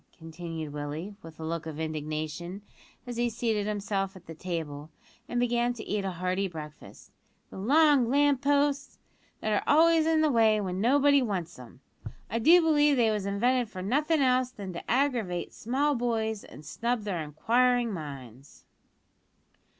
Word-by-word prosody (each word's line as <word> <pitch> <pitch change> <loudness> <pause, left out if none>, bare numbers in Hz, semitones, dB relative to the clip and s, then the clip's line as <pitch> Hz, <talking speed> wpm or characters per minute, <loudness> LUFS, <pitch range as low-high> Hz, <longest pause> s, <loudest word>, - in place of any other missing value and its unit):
continued 165 -2 -7
Willie, 150 +7 -5
with 165 -2 -13
a - - -6
look 165 0 -4
of 155 -1 -6
indignation, 155 +4 -4 0.4
as 245 -1 -6
he 240 0 +1
seated 225 -3 -1
himself 200 -2 -2
at 180 -2 -14
the 165 - -8
table, 160 -4 -5 0.4
and 240 - -1
began 240 0 +1
to 225 -3 -8
eat 205 -1 -1
a 195 - -1
hearty 185 +2 -1
breakfast; 155 -4 -11 0.4
"the - - -9
long 280 +2 +4
lamp 285 0 +3
posts! 285 0 +1 0.4
that 215 - 0
are 205 - +1
always 320 +1 +5
in 320 -1 +3
the 310 -1 +3
way 220 -3 +4
when 185 -2 -3
nobody 280 +4 +4
wants 180 - -3
'em. 125 +1 -13 0.5
I 230 - 0
do 335 +8 +6
believe 295 -3 +4
they 230 -2 +3
was 205 -2 -2
invented 240 +4 +1
for 185 -4 -7
nothin' 295 - +1
else 255 -1 +2
than 200 -7 -8
to 170 - -8
aggravate 240 -9 0
small 275 +6 0
boys 225 -4 -1
and 150 - -13
snub 235 +4 -2
their 190 -5 -3
inquiring 235 - +1
minds." 135 - -9
215 Hz, 165 wpm, -28 LUFS, 170-255 Hz, 0.5 s, do